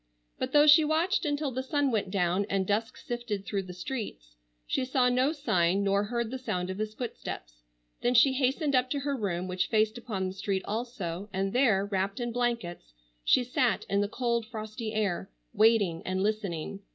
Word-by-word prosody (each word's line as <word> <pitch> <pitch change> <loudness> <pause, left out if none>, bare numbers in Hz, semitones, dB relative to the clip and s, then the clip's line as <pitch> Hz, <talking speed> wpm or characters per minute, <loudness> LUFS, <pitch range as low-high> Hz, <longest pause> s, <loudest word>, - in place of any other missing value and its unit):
But - - -2
though 295 0 +6
she 305 +1 +8
watched 325 +6 +1
until 290 -1 -1
the 260 +1 -2
sun 280 0 0
went 210 -4 0
down 185 +1 +1
and 195 -1 +1
dusk 220 +4 -1
sifted 240 -5 -4
through 200 -2 -1
the 185 -1 -9
streets, 180 - -6 0.3
she 260 - 0
saw 255 -1 +2
no 255 +3 +2
sign 195 - +1
nor 200 +1 +2
heard 235 +1 -2
the 260 - -4
sound 180 -7 -2
of 190 - -6
his 215 0 -3
footsteps. - - -6 0.4
Then 245 +1 +2
she 260 +3 +6
hastened 275 +3 +1
up 255 0 +2
to 280 +1 -1
her 280 0 -1
room, 185 -6 -2
which 180 0 -1
faced 220 +1 +1
upon 210 -6 -3
the 185 - -5
street 195 0 -2
also, 205 -5 -4
and 195 +1 -1
there, 225 -7 +3
wrapped 200 +2 -2
in 240 -1 -2
blankets 230 - -2 0.3
she 250 - +4
sat 250 -1 +1
in 200 0 +3
the 205 - +1
cold 235 0 -1
frosty 220 0 -5
air, 205 -3 -1 0.2
waiting 210 -6 +3
and 185 +1 -1
listening. 200 -4 -2
215 Hz, 190 wpm, -29 LUFS, 190-250 Hz, 0.4 s, she